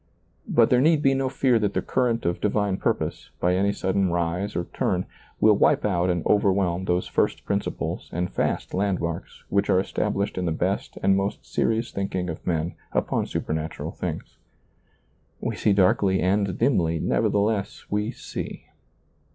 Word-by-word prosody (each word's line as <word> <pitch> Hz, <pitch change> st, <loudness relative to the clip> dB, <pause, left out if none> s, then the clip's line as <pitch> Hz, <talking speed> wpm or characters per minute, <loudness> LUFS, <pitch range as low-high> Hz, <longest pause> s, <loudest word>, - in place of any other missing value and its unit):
But 115 Hz, -2 st, +4 dB
there 125 Hz, 0 st, +5 dB
need 155 Hz, +1 st, +4 dB
be 135 Hz, -, +4 dB
no 135 Hz, -1 st, 0 dB
fear 130 Hz, -3 st, +2 dB
that 105 Hz, -2 st, -1 dB
the -, -, +2 dB
current 120 Hz, -3 st, 0 dB
of 85 Hz, 0 st, -1 dB
divine 105 Hz, -2 st, +1 dB
purpose, -, -, -2 dB
by 90 Hz, +1 st, +2 dB
any 100 Hz, +2 st, +2 dB
sudden 95 Hz, -1 st, 0 dB
rise 85 Hz, +4 st, -1 dB
or 85 Hz, -, 0 dB
turn, 90 Hz, 0 st, 0 dB, 0.3 s
will 110 Hz, 0 st, +6 dB
wipe -, -, +3 dB
out 90 Hz, -3 st, +1 dB
and 85 Hz, -2 st, 0 dB
over 100 Hz, -1 st, +4 dB
whelm 95 Hz, -1 st, 0 dB
those 90 Hz, 0 st, +1 dB
first -, -, 0 dB
principles -, -, -3 dB
and 90 Hz, +1 st, -2 dB
fast -, -, -1 dB
landmarks 90 Hz, -4 st, -2 dB
which 100 Hz, 0 st, +1 dB
are 90 Hz, -, +4 dB
established 100 Hz, 0 st, -1 dB
in 90 Hz, -, -1 dB
the -, -, +1 dB
best 90 Hz, +5 st, -2 dB
and 95 Hz, 0 st, +4 dB
most 95 Hz, +1 st, -2 dB
serious 115 Hz, +1 st, 0 dB
thinking 95 Hz, -3 st, -2 dB
of 80 Hz, -, -10 dB
men 85 Hz, -1 st, 0 dB, 0.2 s
upon -, -, 0 dB
supernatural 80 Hz, 0 st, -3 dB
things. -, -, -6 dB, 1.0 s
We -, -, -2 dB
see 105 Hz, -, +2 dB
darkly 95 Hz, 0 st, +3 dB
and 95 Hz, +1 st, +1 dB
dimly, 85 Hz, -, +2 dB
nevertheless 100 Hz, +3 st, 0 dB
we 105 Hz, +1 st, 0 dB
see. -, -, -7 dB
95 Hz, 165 wpm, -25 LUFS, 90-105 Hz, 1.0 s, will